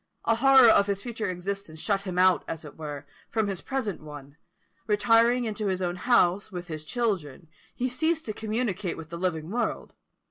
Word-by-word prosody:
A 230 - +2
horror 265 0 +7
of 200 -2 +5
his 200 -1 -2
future 230 -3 -3
existence 185 -2 -5
shut 195 +2 0
him 185 -3 -5
out, 185 0 +4
as 160 -1 -5
it 150 - -11
were, 145 -3 -7 0.2
from 220 -2 0
his 195 -3 -3
present 240 -10 -3
one: 145 -2 -11 0.5
retiring 230 +3 +3
into 215 -1 -3
his 185 -1 0
own 175 0 -1
house, 195 -2 +2
with 180 -1 -7
his 155 -1 -5
children, 180 - -2 0.3
he 250 - -1
ceased 315 +6 0
to 215 - -3
communicate 215 -4 -2
with 160 -1 -9
the 170 - -5
living 170 -2 -2
world. 240 +2 -2
200 Hz, 185 wpm, -27 LUFS, 170-230 Hz, 0.5 s, horror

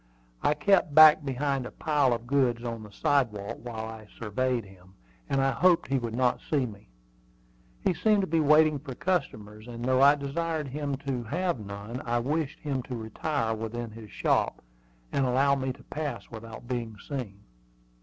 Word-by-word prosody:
I 150 - +2
kept 150 -1 +2
back 155 -1 +9
behind 135 -1 -1
a - - -10
pile 145 -4 +1
of 115 0 -2
goods 125 -3 +1
on 115 -2 -4
the 105 - -10
sidewalk 110 -2 0
while 115 -2 -5
I 110 -1 -9
surveyed 120 +1 -1
him, 95 -1 -18 0.3
and 135 - +1
I 135 - +3
hoped 175 +3 +3
he 135 -1 +2
would 115 -2 -4
not 125 0 +2
see 140 -4 +2
me. 100 - -11 0.9
He - - +3
seemed 210 +3 +3
to 190 - -1
be 165 +1 +1
waiting 155 0 +5
for 135 -3 -8
customers; 110 - -2
and 120 0 -6
though 130 0 +3
I 140 +1 +7
desired 150 +1 -3
him 145 +1 -2
to 125 -4 -2
have 175 +3 -1
none, 105 +4 -7
I 120 0 0
wished 145 +5 -1
him 140 -3 -2
to 125 0 -6
retire 115 +2 -2
within 115 +1 -5
his 110 -1 -11
shop, - - 0 0.5
and 140 - +1
allow 135 +2 +3
me 130 -1 -1
to 130 - -12
pass 150 -1 -5
without 115 +1 -9
being 120 -4 -4
seen. 115 -9 -5
130 Hz, 180 wpm, -28 LUFS, 115-145 Hz, 0.9 s, back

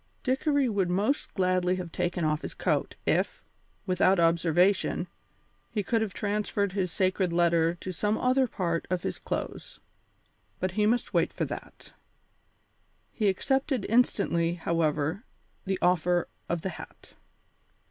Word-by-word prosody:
Dickory 275 +1 +2
would 200 -5 0
most 205 +11 0
gladly 185 -1 +2
have 180 -2 -6
taken 175 -1 -1
off 155 0 0
his - - -6
coat - - 0
if, - - 0 0.4
without 185 0 +3
observation, 170 +3 +2 0.6
he 210 -3 -2
could 225 +4 +1
have 220 -3 -1
transferred 205 -1 -1
his 185 -2 -1
sacred 185 0 +1
letter 170 -1 +3
to 185 +2 -6
some 210 +5 0
other 255 +1 +2
part 170 -6 -2
of 180 -1 -1
his - - -3
clothes, - - -5 0.8
but 185 - -1
he 210 +3 +2
must 240 +2 0
wait - - +2
for - - -2
that. - - -9 1.2
He 215 - 0
accepted 265 +4 0
instantly, 185 -8 +2
however, 160 +2 0 0.4
the 190 -1 0
offer 175 0 +2 0.2
of 170 -1 -1
the 190 - -1
hat. 165 - -11
185 Hz, 135 wpm, -28 LUFS, 170-210 Hz, 1.2 s, without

